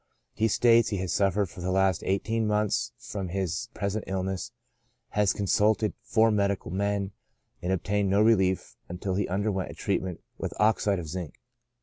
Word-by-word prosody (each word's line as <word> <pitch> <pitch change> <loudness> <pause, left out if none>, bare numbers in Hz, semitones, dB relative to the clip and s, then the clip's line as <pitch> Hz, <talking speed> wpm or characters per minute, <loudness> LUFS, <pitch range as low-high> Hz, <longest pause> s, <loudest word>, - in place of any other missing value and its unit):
He 110 - +1
states 115 +1 +4
he 100 - -1
has 95 -2 -2
suffered 100 +1 +2
for 90 0 -11
the 90 - -2
last 95 -2 +2
eighteen 110 +3 0
months 105 +2 +1
from 105 -5 -5
his 95 -1 -2
present 100 +3 -2
illness, 95 -1 -3 0.6
has 105 -2 +2
consulted 105 +2 +2
four 110 0 +3
medical 100 -5 0
men, 100 +1 -1 0.5
and 90 - -1
obtained 100 +2 0
no 100 +1 +3
relief 95 -5 +2
until 90 +2 -3
he 100 +2 0
underwent 95 0 -1
a - - -8
treatment 90 -2 -2 0.2
with - - -4
oxide 105 -2 +3
of 85 -3 -5
zinc." 85 -1 -5
100 Hz, 160 wpm, -28 LUFS, 95-105 Hz, 0.6 s, states